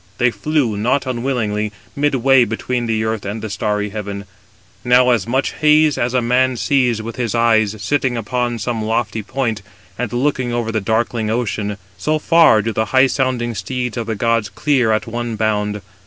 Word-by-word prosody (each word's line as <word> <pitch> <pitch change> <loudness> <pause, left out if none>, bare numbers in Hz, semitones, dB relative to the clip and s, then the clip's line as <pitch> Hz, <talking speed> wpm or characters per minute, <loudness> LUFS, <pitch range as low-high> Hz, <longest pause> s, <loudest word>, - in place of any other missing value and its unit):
They 125 0 +3
flew, 140 -7 -1
not 125 +6 +1
unwillingly, 120 -5 -2 0.2
midway 135 -2 +3
between 120 +2 -2
the 110 -1 0
earth 110 -2 -2
and 105 +3 -4
the 110 - -4
starry 105 0 -1
heaven. 100 -1 -6 0.6
Now, 125 0 +4
as 115 -4 +1
much 130 +3 0
haze 150 0 +4
230 - - -3
as 125 - -6
a 125 - +2
man 130 +1 +2
sees 125 -4 +1
with 115 +2 -7
his 120 -2 -2
eyes, 110 -3 +3
sitting 125 +4 0
upon 120 +1 -2
some 115 0 -3
lofty 110 0 -1
point, 115 -2 -2 0.4
and 125 -4 -2
looking 130 -1 0
over 120 -1 -1
the 110 -1 -1
darkling 110 +1 -1
ocean, 105 -3 -2 0.2
so 155 +10 +1
far 155 -9 +4
do 115 - -2
the 110 - 0
high 130 +4 +4
sounding 130 -3 -1
steeds 125 +4 -4
of 115 -2 -4
the 110 - -2
gods 115 0 0
clear 130 -7 +1
at 110 - 0
one 120 0 -4
bound. 105 -2 -1
115 Hz, 185 wpm, -18 LUFS, 110-125 Hz, 0.6 s, Now